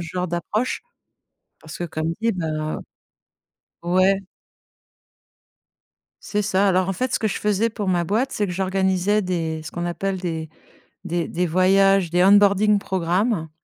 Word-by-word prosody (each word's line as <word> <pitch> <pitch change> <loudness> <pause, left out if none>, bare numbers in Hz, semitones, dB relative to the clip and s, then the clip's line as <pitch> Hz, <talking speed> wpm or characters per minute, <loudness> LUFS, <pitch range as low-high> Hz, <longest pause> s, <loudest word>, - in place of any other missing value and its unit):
genre 180 +2 -3
d'approche. 180 +8 -2 0.8
Parce 155 - -10
que 175 - -3
comme 160 -1 -3
je 230 +1 +2
dis - - -8
heu 155 -1 -2 1.1
ouais. 185 +3 +3 2.0
C'est 210 0 -1
ça. 200 0 +2
Alors 185 0 +2
en - - +1
fait, 250 +7 -2
ce - - +2
que 220 - 0
je - - -3
faisais 210 +2 +1
pour 210 -3 -4
ma 175 -2 +1
boîte, 230 +10 0
c'est 205 - -1
que 180 - -4
j'organisais 190 +2 +1
des 165 -4 -2
ce 160 - -7
qu'on 175 - -4
appelle 190 +2 -2
des 165 -3 -4 0.6
des 175 -2 -2
des 180 +2 -1
voyages, 190 +1 +3
des 175 +1 +3
onboarding 205 +1 +5
program. 185 0 -1
185 Hz, 155 wpm, -22 LUFS, 175-200 Hz, 2.0 s, onboarding